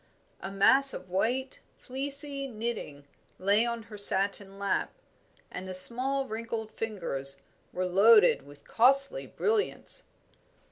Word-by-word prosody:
A 190 - -7
mass 265 +8 +4
of 185 0 -11
white, 250 +8 -2 0.2
fleecy 275 +1 -1
knitting 215 - -6 0.3
lay 205 +5 +1
on 235 -1 -5
her 215 -2 -11
satin 195 0 +3
lap, 200 0 -2 0.6
and 185 +1 -8
the 185 - -5
small, 265 +8 0
wrinkled 220 -1 -6
fingers 140 -12 -4 0.3
were 185 - -3
loaded 200 +2 +4
with 145 +1 -17
costly 275 - +2
brilliants. 430 +1 -1
220 Hz, 120 wpm, -28 LUFS, 190-265 Hz, 0.6 s, mass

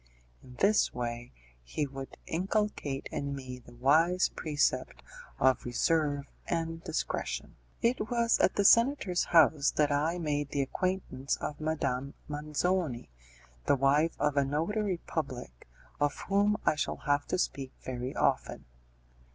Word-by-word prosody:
In 125 - -14
this 200 - +3
way 120 -1 -4 0.3
he - - -2
would 135 -1 -8
inculcate 180 -6 -1
in 140 0 -3
me 130 -2 -7
the 120 0 -16
wise 160 +9 +3
precept 145 -4 -1 0.3
of 130 -2 +3
reserve 145 +3 +1 0.2
and 165 -1 -2
discretion. - - -3 0.3
It 230 -2 +1
was 235 -1 +2
at - - +3
the 200 - +2
senator's 230 -6 +4
house 155 -3 +5
that 150 -1 +1
I 155 +4 +1
made 145 -4 -1
the 140 0 0
acquaintance 140 -3 -2
of 150 +1 -5
Madame 140 -3 -2
Manzoni, 150 - -1 0.6
the - - +5
wife 140 +4 +3
of 150 -1 +1
a 140 - +5
notary 180 +8 -1
public, 125 - -5 0.3
of 145 0 +1
whom 205 +1 +3
I - - +4
shall 155 -1 -2
have 145 0 +1
to - - 0
speak 135 -7 -2
very 125 0 -4
often. - - 0
150 Hz, 135 wpm, -30 LUFS, 135-175 Hz, 0.6 s, house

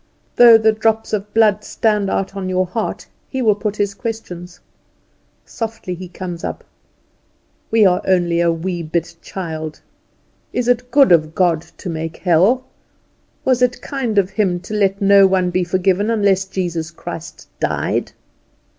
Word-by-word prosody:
Though 235 -2 +8
the 220 0 +3
drops 220 0 0
of 210 0 -2
blood 210 -1 +3
stand 210 -2 0
out 195 +1 -2
on 190 -1 -4
your 185 0 +1
heart 220 +5 -4 0.2
he 265 - -4
will 215 -2 +5
put 210 0 -3
his 205 -1 -1
question. 200 -5 -6 1.0
Softly 225 -5 -5
he 180 +1 -8
comes 175 -1 -7
up - - -5 1.1
(we 220 -2 +4
are 180 -1 +3
only 175 -2 +2
a 170 0 +3
wee 175 +1 -3
bit 170 +1 -3
child); 160 -4 -6 0.7
"Is 245 - -1
it 245 0 +1
good 275 -3 +5
of 155 -2 +3
God 175 -4 +2 0.2
to - - -8
make 165 -1 -4
hell? 185 +9 +3 0.8
Was 255 -1 +2
it 250 0 +1
kind 255 -7 -3
of 195 -1 +2
Him 190 -5 0
to 190 +4 -8
let 200 -1 +1
no 200 0 +7
one 185 -1 +1
be 185 0 +1
forgiven 185 +3 +1
unless 200 -4 +2
Jesus 175 -4 -3
Christ 170 -1 -9
died?" - - -1
195 Hz, 155 wpm, -18 LUFS, 175-220 Hz, 1.1 s, Though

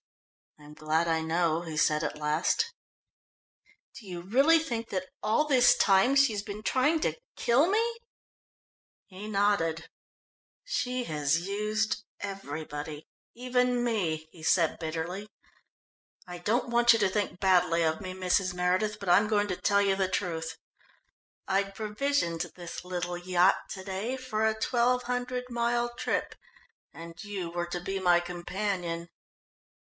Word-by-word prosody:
"I'm 150 0 -13
glad 155 +2 0
I 160 -1 +1
know," 165 0 +1
he 160 -3 -6
said 155 0 +2
at - - -3
last. 155 - 0 1.2
"Do 215 - -11
you 175 -2 -6
really 270 - +4
think 235 -8 -3
that 185 -1 -3
all 220 +8 +2
this 260 -5 +5
time 195 +7 +4
she 275 -5 +5
has 205 - -2
been 205 +1 -8
trying 290 +7 +2
to - - +1 0.2
kill 255 +7 +3
me?" 460 +3 +1 1.1
He 195 +2 -9
nodded. 195 -6 +1 0.7
"She 255 - -2
has 150 0 0
used 210 +3 -1 0.2
everybody, 155 -5 -6 0.3
even 250 0 +1
me," 170 -10 -1
he 165 - -15
said 165 0 +2
bitterly. 170 +5 -4 1.0
"I 175 0 -7
don't 235 +7 0
want 235 0 +5
you 225 - +1
to 205 -2 +3
think 200 -2 -2
badly 180 -3 +3
of 160 +2 0
me, 185 -1 -5
Mrs. 185 0 +1
Meredith, 185 +4 0
but 200 - -4
I'm 200 +5 +5
going 205 -1 +1
to 185 - -1
tell 200 0 +2
you 195 -1 +2
the 190 -1 +1
truth. 165 -4 -3 0.9
I'd 195 0 0
provisioned 210 -5 -1
this 175 -1 -7
little 175 -1 -3
yacht 180 +1 +2
to 190 - -7
day 200 +6 -3
for 230 -4 -1
a 220 0 0
twelve 245 +2 +2
hundred 250 +1 -2
mile 240 0 0
trip, - - -2 0.6
and 165 +3 -10
you 200 -4 -4
were 175 0 -3
to 175 +1 -4
be 195 +2 -3
my 175 -2 +4
companion." 175 -1 -3
195 Hz, 145 wpm, -29 LUFS, 170-235 Hz, 1.2 s, this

